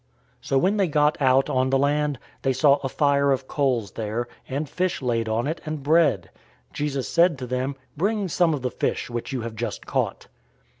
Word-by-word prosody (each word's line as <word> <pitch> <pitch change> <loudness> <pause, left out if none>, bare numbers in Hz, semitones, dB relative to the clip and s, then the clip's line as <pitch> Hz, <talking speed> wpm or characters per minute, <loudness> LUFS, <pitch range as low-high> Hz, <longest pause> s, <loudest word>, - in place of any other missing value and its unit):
021:009 - - -14
So 135 - +2
when 190 +9 +2
they 195 -2 +2
got 150 -1 +2
out 130 0 +4
on 130 0 +1
the 135 - +3
land, 145 +1 +1 0.2
they 135 - +1
saw 140 +2 +4
a 135 -2 -4
fire 140 0 +2
of 130 0 -1
coals 125 -8 0
there, 115 +2 -3 0.2
and 140 +3 -2
fish 185 +4 -1
laid 115 -3 -1
on 115 +3 0
it, 155 +4 -3
and 155 -3 -5
bread. 150 - +3 0.4
021:010 - - -30
Jesus 140 -3 -2
said 170 -2 +3
to 130 - -5
them, 130 +2 -2 0.2
"Bring 200 +4 0
some 170 -1 +2
of 135 - -7
the 125 - -1
fish 125 - -2
which 120 +3 -4
you 130 -3 -2
have 115 0 -5
just 120 +2 -4
caught." - - -2
140 Hz, 210 wpm, -24 LUFS, 125-150 Hz, 0.4 s, out